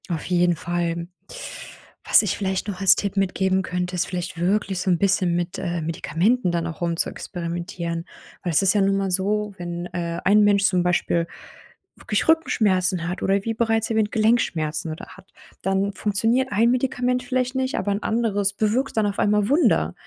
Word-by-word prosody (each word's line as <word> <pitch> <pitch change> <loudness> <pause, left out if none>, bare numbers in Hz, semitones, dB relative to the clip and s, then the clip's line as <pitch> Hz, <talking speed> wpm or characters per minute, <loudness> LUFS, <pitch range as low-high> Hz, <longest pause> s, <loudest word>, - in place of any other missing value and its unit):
Auf 165 -3 -3
jeden 175 -1 +2
Fall. 170 0 -3 1.0
Was - - +6
ich 210 - -1
vielleicht 190 -1 -2
noch 195 -2 -5
als 190 -1 +8
Tipp 200 0 -3
mitgeben 190 -1 +1
könnte, 180 0 -3
ist 180 - +1
vielleicht 175 -2 -5
wirklich 190 +1 0
so 185 - -1
'n 175 - +3
bisschen 190 -2 +1
mit, 175 0 -3
äh, 175 -2 -3
Medikamenten 175 +7 0
dann 170 -1 -1
auch 165 -1 -7
rumzuexperimentieren, 170 0 -3 0.4
weil 175 - -1
es 150 - +5
ist 190 - +5
ja 205 - +2
nun 195 0 +3
einmal 195 -1 -1
so, 205 +3 0
wenn, 175 0 -5
äh, 170 -1 -4
ein 210 +2 +5
Mensch 200 -1 +3
zum 185 -4 +2
Beispiel 175 -1 0 0.7
wirklich 210 - -2
Rückenschmerzen 190 - +2
hat 180 +2 -4
oder 195 0 +1
wie 225 - -1
bereits 225 -1 +1
erwähnt, 220 -1 +1
Gelenkschmerzen 165 -9 0
oder 155 - -7
hat, 190 0 -18 0.3
dann 195 +1 0
funktioniert 225 +6 0
ein 230 +3 +3
Medikament 250 0 0
vielleicht 255 0 -1
nicht, 260 0 -1
aber 205 - -1
ein 200 +1 -2
anderes 205 -3 0
bewirkt 220 +6 -1
dann 215 - +3
auf 200 - -4
einmal 210 0 +2
Wunder. 230 - +2
195 Hz, 180 wpm, -23 LUFS, 175-215 Hz, 1.0 s, als